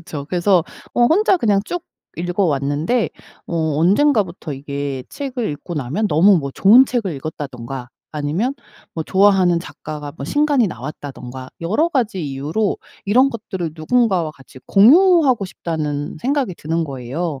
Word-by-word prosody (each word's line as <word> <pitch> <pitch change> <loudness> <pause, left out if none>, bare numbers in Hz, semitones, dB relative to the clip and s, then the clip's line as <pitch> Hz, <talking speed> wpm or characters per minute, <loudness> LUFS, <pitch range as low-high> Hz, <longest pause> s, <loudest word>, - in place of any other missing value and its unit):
그쵸. 155 -4 -7
그래서 180 0 +2 0.3
어 240 - +3
혼자 385 - +4
그냥 210 - +2
쭉 355 +10 -4 0.3
읽어 180 +3 -1
왔는데 150 - 0 0.4
어 - - -5 0.2
언젠가부터 190 - +2
이게 140 -1 -5
책을 265 -5 -4
읽고 150 +4 -7
나면 150 - -1
너무 180 +5 +5
뭐 140 -3 -4
좋은 225 - +7
책을 230 -8 -1
읽었다든가 135 -4 -6 0.2
아니면 155 - -1 0.4
뭐 160 - -2
좋아하는 190 -1 +3
작가가 150 -4 -8
뭐 140 - -6
신간이 290 - +2
나왔다든가 130 -3 -8
여러 215 - +1
가지 235 - -1
이유로 145 +10 -1 0.3
이런 250 +7 +4
것들을 190 - -5
누군가와 180 0 +1
같이 135 -2 -16
공유하고 275 - +5
싶다는 150 -5 -4
생각이 265 -6 0
드는 165 +1 -2
거예요. 140 +3 -4
175 Hz, 330 characters per minute, -19 LUFS, 145-225 Hz, 0.4 s, 좋은